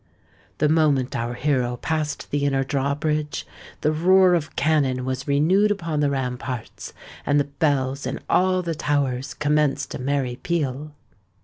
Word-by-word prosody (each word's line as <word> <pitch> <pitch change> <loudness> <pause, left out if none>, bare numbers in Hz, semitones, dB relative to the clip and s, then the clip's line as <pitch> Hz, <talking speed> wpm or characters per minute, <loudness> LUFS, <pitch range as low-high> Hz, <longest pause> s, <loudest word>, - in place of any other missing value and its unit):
The 150 - +2
moment 150 -5 +2
our 120 +1 -2
hero 125 -4 0
passed 155 +2 -3
the 145 0 0
inner 135 -1 +1
drawbridge, 145 +3 -1 0.4
the 150 - +2
roar 185 +3 +5
of 160 -3 -1
cannon 140 -4 +1
was 130 +1 -3
renewed 170 +9 +3
upon 165 -7 -2
the 145 -1 +2
ramparts; 125 -2 -4 0.3
and 145 0 +2
the - - +3 0.2
bells 140 -3 0
in - - -3
all 185 0 +2
the 170 -1 -2
towers 140 -3 -1
commenced 150 -1 0
a - - -5
merry 130 -2 -1
peal. 150 -4 -2
145 Hz, 145 wpm, -23 LUFS, 130-155 Hz, 0.4 s, roar